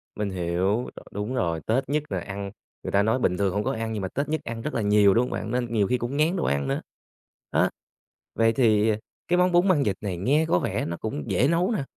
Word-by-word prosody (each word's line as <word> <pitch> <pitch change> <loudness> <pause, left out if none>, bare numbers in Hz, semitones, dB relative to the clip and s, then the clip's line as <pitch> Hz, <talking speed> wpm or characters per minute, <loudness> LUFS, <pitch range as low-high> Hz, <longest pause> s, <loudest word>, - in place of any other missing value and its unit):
Mình 105 -1 -2
hiểu, 95 +5 0
rồi - - -11
đúng 105 +5 -4
rồi, 85 -7 0
Tết 130 +4 0
nhất 150 0 +1
là - - 0
ăn 100 -1 -6 0.3
người - - -4
ta 100 +1 +3
nói 110 +4 +1
bình 90 -6 +1
thường 100 -2 +1
hông 105 +1 0
có - - 0
ăn 115 0 -3
nhưng 105 - -3
mà 95 - -2
Tết 140 +9 -3
nhất 155 -2 -1
ăn 115 0 -5
rất 150 - -4
là 115 - 0
nhiều, 105 -1 +5
đúng 120 - +3
hông 125 - -4
bạn? 110 - -4
Nên 120 -1 -1
nhiều 105 -3 +2
khi 125 - +1
cũng 120 +4 -3
ngán 160 +5 +2
đồ 175 - -1
ăn 70 -1 0
nữa, - - -1 0.7
đó. - - +3 0.7
Vậy 115 0 +3
thì 110 -3 +3 0.4
cái 180 - +2
món 180 0 +3
bún 175 +2 +4
măng 160 -7 +4
vịt 100 -7 0
này 95 -4 -3
nghe 145 - +2
có 90 - +3
vẻ - - -2
nó 85 0 -4
cũng 90 -10 -4
dễ 130 - +3
nấu 175 +6 +2
nè, 210 -11 -1
110 Hz, 265 wpm, -25 LUFS, 100-140 Hz, 0.7 s, nhiều